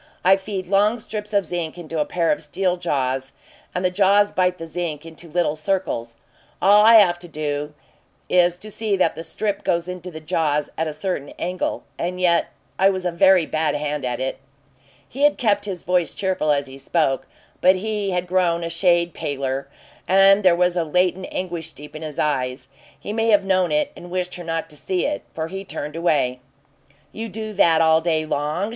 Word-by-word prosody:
I 190 Hz, +1 st, +7 dB
feed 195 Hz, -1 st, -5 dB
long 205 Hz, +5 st, +2 dB
strips 210 Hz, -2 st, -6 dB
of 200 Hz, -2 st, +2 dB
zinc 170 Hz, -1 st, -4 dB
into 165 Hz, -2 st, -5 dB
a 150 Hz, -, +2 dB
pair 170 Hz, -2 st, 0 dB
of -, -, -1 dB
steel 180 Hz, +4 st, -1 dB
jaws, 135 Hz, -6 st, -2 dB, 0.4 s
and 180 Hz, +1 st, -1 dB
the 180 Hz, -, +2 dB
jaws 200 Hz, +2 st, +4 dB
bite 180 Hz, -1 st, +1 dB
the 165 Hz, -, -7 dB
zinc 165 Hz, -2 st, -4 dB
into 165 Hz, +1 st, -10 dB
little 165 Hz, -2 st, 0 dB
circles. 155 Hz, -9 st, -2 dB, 0.4 s
All 205 Hz, +2 st, +6 dB
I 225 Hz, +1 st, +8 dB
have 180 Hz, -5 st, +6 dB
to 175 Hz, -, -9 dB
do 150 Hz, -1 st, -4 dB, 0.5 s
is 175 Hz, -1 st, +3 dB
to 215 Hz, +4 st, -7 dB
see 210 Hz, -2 st, -1 dB
that 175 Hz, -3 st, +2 dB
the 165 Hz, -, -7 dB
strip 200 Hz, +5 st, -2 dB
goes 170 Hz, 0 st, 0 dB
into 180 Hz, 0 st, -6 dB
the 160 Hz, -3 st, -8 dB
jaws 155 Hz, -2 st, -1 dB
at 160 Hz, -, -1 dB
a -, -, -2 dB
certain 155 Hz, -2 st, -3 dB
angle 180 Hz, +1 st, -3 dB, 0.2 s
and 180 Hz, +1 st, -3 dB
yet 175 Hz, -2 st, +3 dB, 0.3 s
I 195 Hz, +1 st, +6 dB
was 185 Hz, -2 st, -3 dB
a 180 Hz, -, +1 dB
very 185 Hz, 0 st, +5 dB
bad 155 Hz, 0 st, 0 dB
hand 150 Hz, 0 st, -3 dB
at 125 Hz, -1 st, -2 dB
it." 130 Hz, 0 st, -3 dB, 0.7 s
He 270 Hz, -, -8 dB
had 290 Hz, 0 st, +4 dB
kept 205 Hz, -4 st, +1 dB
his 190 Hz, -4 st, -5 dB
voice 180 Hz, -1 st, +1 dB
cheerful 185 Hz, -6 st, 0 dB
as 140 Hz, -1 st, +1 dB
he 135 Hz, 0 st, -9 dB
spoke, 135 Hz, -1 st, 0 dB, 0.3 s
but 185 Hz, +1 st, +6 dB
he 210 Hz, +1 st, -2 dB
had 180 Hz, -1 st, -1 dB
grown 175 Hz, -2 st, +1 dB
a 165 Hz, -, -3 dB
shade 170 Hz, 0 st, +2 dB
paler, 135 Hz, -1 st, -3 dB, 0.4 s
and 195 Hz, +2 st, +6 dB
there 185 Hz, -3 st, +5 dB
was 180 Hz, 0 st, +2 dB
a 175 Hz, -, +1 dB
latent 180 Hz, +3 st, 0 dB
anguish 170 Hz, -3 st, -4 dB
deep 150 Hz, +1 st, -12 dB
in 155 Hz, -, -7 dB
his 155 Hz, -2 st, -7 dB
eyes. 130 Hz, -3 st, -1 dB, 0.3 s
He 205 Hz, -, -5 dB
may 225 Hz, +1 st, 0 dB
have 205 Hz, -3 st, +4 dB
known 185 Hz, -2 st, +2 dB
it 300 Hz, -1 st, +1 dB
and 175 Hz, -, -11 dB
wished 180 Hz, 0 st, -3 dB
her 175 Hz, -, -7 dB
not 165 Hz, -1 st, -3 dB
to -, -, -12 dB
see 180 Hz, +4 st, -2 dB
it, 295 Hz, 0 st, -2 dB
for 160 Hz, 0 st, -3 dB
he 190 Hz, +3 st, -6 dB
turned 150 Hz, -5 st, -6 dB
away. 145 Hz, -7 st, +1 dB, 0.7 s
"You 225 Hz, +1 st, -6 dB
do 215 Hz, +2 st, -6 dB
that 165 Hz, -4 st, +4 dB
all 160 Hz, 0 st, +4 dB
day 160 Hz, -2 st, 0 dB
long?" 155 Hz, +6 st, -1 dB
175 Hz, 205 wpm, -22 LUFS, 155-190 Hz, 0.7 s, I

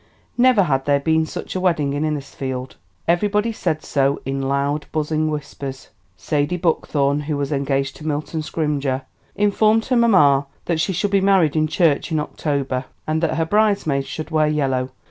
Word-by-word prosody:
Never 245 Hz, -4 st, +5 dB
had 135 Hz, -5 st, 0 dB
there 145 Hz, -1 st, +3 dB
been 160 Hz, +2 st, +1 dB
such -, -, -6 dB
a -, -, 0 dB
wedding 165 Hz, -6 st, +1 dB
in 145 Hz, +2 st, -1 dB
Innisfield. 135 Hz, -4 st, -4 dB, 0.3 s
Everybody 205 Hz, +6 st, +2 dB
said 155 Hz, -7 st, -2 dB
so 140 Hz, 0 st, +1 dB
in 135 Hz, 0 st, -2 dB
loud, 140 Hz, +2 st, -1 dB
buzzing 155 Hz, 0 st, 0 dB
whispers. 140 Hz, -3 st, -6 dB, 0.3 s
Sadie 150 Hz, -, -1 dB
Buckthorn, 145 Hz, -4 st, +1 dB
who 150 Hz, 0 st, -3 dB
was 140 Hz, 0 st, -2 dB
engaged 140 Hz, -1 st, -1 dB
to 155 Hz, -, -8 dB
Milton 155 Hz, +1 st, -2 dB
Scrymger, 145 Hz, -4 st, -1 dB, 0.3 s
informed 215 Hz, +2 st, +3 dB
her 255 Hz, -, +1 dB
mamma 150 Hz, -, +4 dB, 0.2 s
that 170 Hz, -2 st, 0 dB
she 175 Hz, -, +1 dB
should 195 Hz, +3 st, -1 dB
be 200 Hz, -1 st, +3 dB
married 190 Hz, -6 st, +3 dB
in 155 Hz, 0 st, +2 dB
church 160 Hz, 0 st, +1 dB
in 155 Hz, -, +1 dB
October, 140 Hz, -4 st, -2 dB, 0.2 s
and 155 Hz, +1 st, -1 dB
that 165 Hz, -, 0 dB
her 165 Hz, -, +1 dB
bridesmaids 195 Hz, -8 st, +1 dB
should 155 Hz, +1 st, -6 dB
wear 155 Hz, -1 st, +3 dB
yellow. 135 Hz, -4 st, 0 dB
155 Hz, 170 wpm, -21 LUFS, 140-175 Hz, 0.3 s, Never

